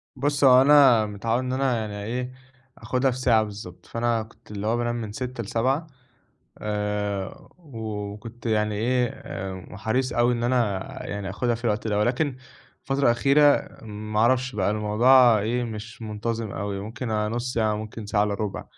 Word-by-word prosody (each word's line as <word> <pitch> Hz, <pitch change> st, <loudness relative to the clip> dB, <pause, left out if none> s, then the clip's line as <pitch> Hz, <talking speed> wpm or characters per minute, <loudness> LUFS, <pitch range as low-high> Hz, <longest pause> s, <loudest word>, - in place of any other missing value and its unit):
بُصّ، 145 Hz, +2 st, 0 dB
هو 130 Hz, -1 st, +8 dB
أنا 135 Hz, -6 st, +6 dB
متعوّد 115 Hz, +4 st, -2 dB
إن 130 Hz, 0 st, -3 dB
أنا 130 Hz, -2 st, +1 dB
يعني 105 Hz, -2 st, -5 dB
إيه 125 Hz, +3 st, -3 dB, 0.5 s
آخُدها 125 Hz, +4 st, 0 dB
في 125 Hz, -, -5 dB
ساعة 115 Hz, -4 st, +3 dB
بالضبط، 100 Hz, -4 st, -9 dB
فأنا 115 Hz, -1 st, -1 dB
كنت 110 Hz, -1 st, -18 dB
اللي 105 Hz, +1 st, -4 dB
هو 115 Hz, +2 st, +1 dB
بانام 120 Hz, 0 st, -1 dB
من 110 Hz, -3 st, -5 dB
18:00 125 Hz, 0 st, -5 dB
ل19:00 130 Hz, +9 st, 0 dB, 0.7 s
آآ 105 Hz, -2 st, -3 dB
وكنت 110 Hz, -, -7 dB
يعني 105 Hz, -1 st, +1 dB
إيه، 125 Hz, +3 st, +1 dB
آآ 95 Hz, -10 st, -7 dB
وحريص 110 Hz, +5 st, -1 dB
أوي 120 Hz, +1 st, +3 dB
إن 120 Hz, 0 st, -2 dB
أنا 115 Hz, -6 st, +1 dB, 0.2 s
يعني 100 Hz, -2 st, -4 dB
آخُدها 120 Hz, +4 st, 0 dB
في 115 Hz, +1 st, -9 dB
الوقت 110 Hz, 0 st, 0 dB
ده، 105 Hz, 0 st, +1 dB
ولكن 125 Hz, +5 st, 0 dB, 0.5 s
الفترة 135 Hz, 0 st, -1 dB
الأخيرة 140 Hz, +5 st, +4 dB, 0.2 s
ما 105 Hz, 0 st, -3 dB
أعرَفش 130 Hz, +2 st, +2 dB
بقى 100 Hz, -1 st, +1 dB
الموضوع 110 Hz, +3 st, +5 dB
إيه، 120 Hz, +4 st, -1 dB
مش 115 Hz, 0 st, -8 dB
منتظِم 110 Hz, 0 st, -3 dB
أوي، 100 Hz, 0 st, -4 dB
ممكن 115 Hz, +3 st, -5 dB
آآ 105 Hz, -1 st, 0 dB
نُص 120 Hz, +2 st, -3 dB
ساعة، 110 Hz, -2 st, +1 dB
ممكن 110 Hz, 0 st, -6 dB
ساعة 105 Hz, 0 st, +2 dB
إلّا 105 Hz, -1 st, -1 dB
رُبع، 105 Hz, -1 st, -4 dB
115 Hz, 170 wpm, -25 LUFS, 105-125 Hz, 0.7 s, هو